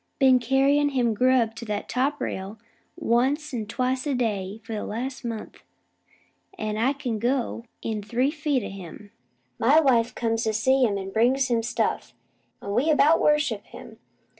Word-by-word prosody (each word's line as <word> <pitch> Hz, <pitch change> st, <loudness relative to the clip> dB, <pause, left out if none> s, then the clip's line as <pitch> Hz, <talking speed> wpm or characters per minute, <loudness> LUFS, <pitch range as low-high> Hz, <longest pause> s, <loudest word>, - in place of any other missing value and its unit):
Been 260 Hz, -2 st, +5 dB
carryin' 275 Hz, +4 st, +2 dB
him 240 Hz, -3 st, +2 dB
grub 250 Hz, -1 st, +2 dB
to 235 Hz, -, -7 dB
that 210 Hz, -2 st, -3 dB
top 280 Hz, +3 st, 0 dB
rail 195 Hz, +3 st, -4 dB, 0.4 s
once 275 Hz, +6 st, 0 dB
an' 220 Hz, -4 st, -3 dB
twice 255 Hz, +4 st, -1 dB
a 280 Hz, -, 0 dB
day 210 Hz, -4 st, -2 dB
for 225 Hz, -, -7 dB
the 210 Hz, -, -3 dB
last 245 Hz, +3 st, -5 dB
month, 230 Hz, -2 st, -6 dB, 1.0 s
an' 215 Hz, -8 st, -3 dB
I 250 Hz, +5 st, +2 dB
can 250 Hz, -6 st, -4 dB
go 240 Hz, 0 st, -1 dB, 0.2 s
in 220 Hz, -2 st, -2 dB
three 245 Hz, +6 st, 0 dB
feet 295 Hz, -5 st, -1 dB
o' -, -, -5 dB
him. 195 Hz, +2 st, -10 dB, 0.5 s
My 280 Hz, +7 st, +5 dB
wife 245 Hz, -6 st, +2 dB
comes 225 Hz, -1 st, -1 dB
to 220 Hz, -, 0 dB
see 260 Hz, +5 st, +2 dB
him, 205 Hz, -3 st, 0 dB
an' 195 Hz, 0 st, -6 dB
brings 250 Hz, +5 st, +2 dB
him 235 Hz, -1 st, +2 dB
stuff; 235 Hz, +3 st, -2 dB, 0.5 s
an' 200 Hz, -, -4 dB
we 255 Hz, +9 st, +2 dB
about 310 Hz, +1 st, +4 dB
worship 295 Hz, -9 st, +2 dB
him. -, -, -12 dB
240 Hz, 170 wpm, -25 LUFS, 220-270 Hz, 1.0 s, Been